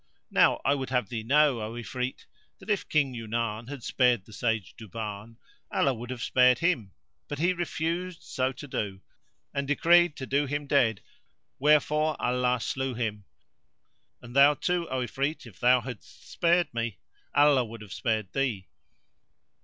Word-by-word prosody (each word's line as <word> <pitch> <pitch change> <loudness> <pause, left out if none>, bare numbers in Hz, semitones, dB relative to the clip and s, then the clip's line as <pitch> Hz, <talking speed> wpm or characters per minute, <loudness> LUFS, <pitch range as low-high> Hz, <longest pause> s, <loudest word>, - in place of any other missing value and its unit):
Now - - +4
I 140 - +4
would 135 -2 -3
have 125 -6 0
thee 115 -2 -3
know, 140 +1 +3
O 110 +1 -5
Ifrit, 125 +2 -4 0.3
that - - -5
if 205 - -1
King 140 -4 +2
Yunan 115 -1 -3
had 140 -4 -7
spared 125 -6 +2
the 110 - -15
Sage 110 -4 -1
Duban, 110 0 -7 0.4
Allah 135 - +2
would 120 0 -8
have 125 -2 -5
spared 125 -1 +4
him, 125 - 0 0.4
but 145 - -5
he 175 +5 +2
refused 170 +1 -3
so 130 0 -1
to 140 +3 -10
do 100 -6 -4 0.5
and 140 -1 -2
decreed 170 +2 +4
to 130 - -6
do 140 +2 +1
him 145 +1 -3
dead, 120 -7 +2 0.6
wherefore 150 +2 +3
Allah 125 0 +1
slew 130 +2 -2
him; 105 -4 -3 1.0
and 120 +1 -11
thou 140 +1 +7
too, 175 0 -1
O 130 0 -1
Ifrit, 135 +5 -2
if 105 -6 -14
thou 125 +1 +5
hadst 125 +5 -10
spared 170 0 +2
me, 115 -5 -3 0.4
Allah 145 -3 +5
would 115 -1 -9
have 100 -4 -9
spared 110 -1 -2
thee. 120 -9 -1
125 Hz, 160 wpm, -28 LUFS, 115-145 Hz, 1.0 s, thou